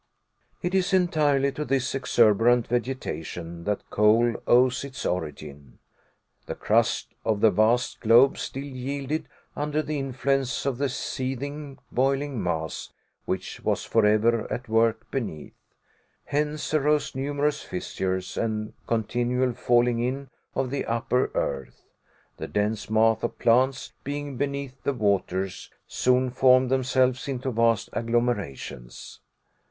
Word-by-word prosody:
It 175 Hz, +1 st, -1 dB
is 190 Hz, -1 st, +1 dB
entirely 150 Hz, -7 st, +3 dB
to 150 Hz, -, -4 dB
this 135 Hz, -3 st, 0 dB
exuberant 120 Hz, -2 st, +4 dB
vegetation 85 Hz, -, -4 dB
that 105 Hz, -1 st, -2 dB
coal 110 Hz, +3 st, +4 dB
owes 125 Hz, +1 st, +4 dB
its 140 Hz, -1 st, -7 dB
origin. 75 Hz, -6 st, -5 dB, 0.7 s
The -, -, -4 dB
crust -, -, +1 dB
of 110 Hz, -2 st, 0 dB
the 110 Hz, +1 st, +5 dB
vast 115 Hz, +4 st, +2 dB
globe 120 Hz, +4 st, +5 dB
still 135 Hz, -, -4 dB
yielded 140 Hz, +2 st, -4 dB, 0.3 s
under 150 Hz, +1 st, -1 dB
the 150 Hz, -1 st, -3 dB
influence 135 Hz, -1 st, -1 dB
of 135 Hz, -3 st, -1 dB
the 140 Hz, -1 st, +1 dB
seething, 135 Hz, +3 st, -4 dB
boiling 135 Hz, -1 st, 0 dB
mass, 80 Hz, -4 st, -3 dB, 0.4 s
which -, -, -4 dB
was -, -, 0 dB
forever 110 Hz, +1 st, +2 dB
at 125 Hz, +1 st, -4 dB
work 115 Hz, 0 st, +1 dB
beneath. 110 Hz, -, -4 dB, 0.7 s
Hence 150 Hz, +1 st, -2 dB
arose 150 Hz, 0 st, +2 dB
numerous 145 Hz, +2 st, -1 dB
fissures, 95 Hz, 0 st, -3 dB
and 110 Hz, -1 st, -2 dB
continual 120 Hz, +3 st, 0 dB
falling 120 Hz, -1 st, +2 dB
in 130 Hz, +2 st, -3 dB, 0.2 s
of 130 Hz, -2 st, -1 dB
the 140 Hz, -, -1 dB
upper 115 Hz, +2 st, +1 dB
earth. 70 Hz, -2 st, -3 dB, 0.5 s
The -, -, -5 dB
dense 105 Hz, +1 st, -1 dB
mass 110 Hz, 0 st, +3 dB
of -, -, -3 dB
plants 130 Hz, +3 st, +2 dB
being 145 Hz, 0 st, -4 dB
beneath 140 Hz, -1 st, -3 dB
the 140 Hz, -, 0 dB
waters, 95 Hz, -4 st, -1 dB, 0.2 s
soon 125 Hz, 0 st, +2 dB
formed 130 Hz, 0 st, +4 dB
themselves 130 Hz, 0 st, +1 dB
into 130 Hz, -1 st, -2 dB
vast 115 Hz, -1 st, +2 dB
agglomerations. 115 Hz, -, -3 dB
125 Hz, 125 wpm, -26 LUFS, 110-135 Hz, 0.7 s, the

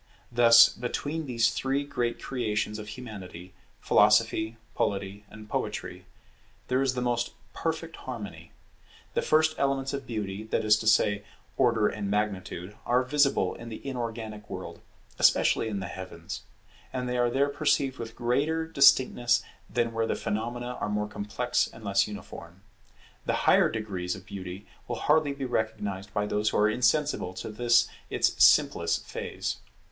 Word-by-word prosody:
Thus 115 Hz, -1 st, +8 dB
between 145 Hz, +7 st, -4 dB
these 115 Hz, -2 st, +2 dB
three 135 Hz, +4 st, -1 dB
great 125 Hz, -4 st, -2 dB
creations 105 Hz, -4 st, -2 dB
of 105 Hz, -, -8 dB
Humanity, 100 Hz, -6 st, -9 dB, 0.3 s
Philosophy, 110 Hz, +1 st, +3 dB, 0.2 s
Polity, 100 Hz, +1 st, -2 dB
and 110 Hz, 0 st, -12 dB
Poetry, -, -, -4 dB, 0.6 s
there 130 Hz, +1 st, +2 dB
is 130 Hz, -2 st, +1 dB
the 125 Hz, -, -1 dB
most 120 Hz, -1 st, -1 dB, 0.2 s
perfect 165 Hz, 0 st, -3 dB
harmony. 115 Hz, -5 st, -8 dB, 0.6 s
The -, -, +1 dB
first 155 Hz, 0 st, +3 dB
elements 135 Hz, 0 st, 0 dB
of 140 Hz, -1 st, -5 dB
Beauty, 105 Hz, -3 st, -4 dB
that 110 Hz, -, -1 dB
is 105 Hz, 0 st, +5 dB
to 110 Hz, -, -4 dB
say, 105 Hz, -2 st, +3 dB, 0.3 s
Order 115 Hz, -5 st, +3 dB
and 100 Hz, -2 st, -3 dB
Magnitude, 100 Hz, -2 st, -2 dB
are 125 Hz, +1 st, +2 dB
visible 140 Hz, +1 st, +2 dB
in 115 Hz, -, -9 dB
the 110 Hz, -, -7 dB
inorganic 115 Hz, -5 st, -5 dB
world, 95 Hz, -1 st, -7 dB, 0.4 s
especially -, -, +4 dB
in 100 Hz, -3 st, -3 dB
the -, -, -4 dB
heavens; 95 Hz, -1 st, -7 dB, 0.5 s
and 125 Hz, -1 st, -3 dB
they 125 Hz, 0 st, -1 dB
are 120 Hz, 0 st, +3 dB
there 140 Hz, +3 st, +2 dB
perceived 140 Hz, -2 st, +1 dB
with 115 Hz, -1 st, -6 dB
greater 145 Hz, +7 st, 0 dB
distinctness 130 Hz, -5 st, +4 dB, 0.3 s
than 120 Hz, -2 st, 0 dB
where 115 Hz, 0 st, 0 dB
the -, -, 0 dB
phenomena 120 Hz, +3 st, -3 dB
are -, -, -1 dB
more 105 Hz, 0 st, -1 dB
complex 105 Hz, +4 st, -1 dB
and 115 Hz, -, -13 dB
less 100 Hz, -1 st, +2 dB
uniform. 95 Hz, -3 st, -10 dB, 0.6 s
The -, -, +2 dB
higher -, -, +5 dB
degrees 95 Hz, -5 st, -3 dB
of 95 Hz, -1 st, -12 dB
Beauty 95 Hz, -1 st, -7 dB, 0.2 s
will -, -, -2 dB
hardly 150 Hz, -1 st, +2 dB
be 140 Hz, -1 st, -5 dB
recognized 105 Hz, -4 st, -2 dB
by 105 Hz, 0 st, 0 dB
those 105 Hz, +1 st, 0 dB
who -, -, -1 dB
are 105 Hz, -, +4 dB
insensible 125 Hz, -6 st, +1 dB
to 110 Hz, -, -6 dB
this 120 Hz, +1 st, +3 dB, 0.2 s
its -, -, +2 dB
simplest 85 Hz, 0 st, +4 dB
phase. -, -, -4 dB
115 Hz, 155 wpm, -28 LUFS, 105-125 Hz, 0.6 s, Thus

